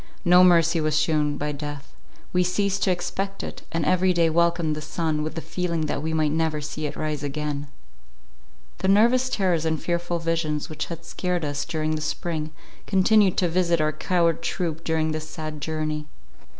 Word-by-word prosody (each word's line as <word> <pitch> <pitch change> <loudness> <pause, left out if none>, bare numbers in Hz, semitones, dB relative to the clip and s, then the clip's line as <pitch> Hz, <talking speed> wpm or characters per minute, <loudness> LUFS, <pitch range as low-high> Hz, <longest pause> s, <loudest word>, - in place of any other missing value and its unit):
No 180 +1 +7
mercy 170 -2 +5
was 155 0 +2
shewn 150 -2 +1
by 150 +1 -2
death; 145 -1 -7 0.4
we 180 0 +3
ceased 200 +2 0
to 190 - +3
expect 195 +2 -3
it, - - -7
and 165 -2 -1
every 185 0 +3
day 165 -2 +3
welcomed 170 -1 +2
the 155 - -5
sun 155 0 -1
with 155 +1 -4
the 165 - -3
feeling 170 -2 -2
that 150 -2 -2
we 160 +1 -2
might 155 -2 +1
never 160 -1 0
see 150 +1 -4
it - - -7
rise 155 -2 -3
again. 145 0 -3 1.1
The 190 - -1
nervous 240 +6 +4
terrors 180 -8 +1
and 160 -1 0
fearful 175 +1 -1
visions 165 -3 -1
which 155 - -3
had 170 -1 -7
scared 180 -1 -2
us 145 -1 -2
during 155 -1 -1
the 155 - -2
spring, 155 0 -3 0.4
continued 195 0 +4
to 180 - +3
visit 170 0 +2
our 155 0 +1
coward 170 0 +1
troop 165 -3 -2
during 160 -1 0
this 155 0 -4
sad 155 -1 -6
journey. 155 -1 -2
160 Hz, 185 wpm, -24 LUFS, 155-175 Hz, 1.1 s, No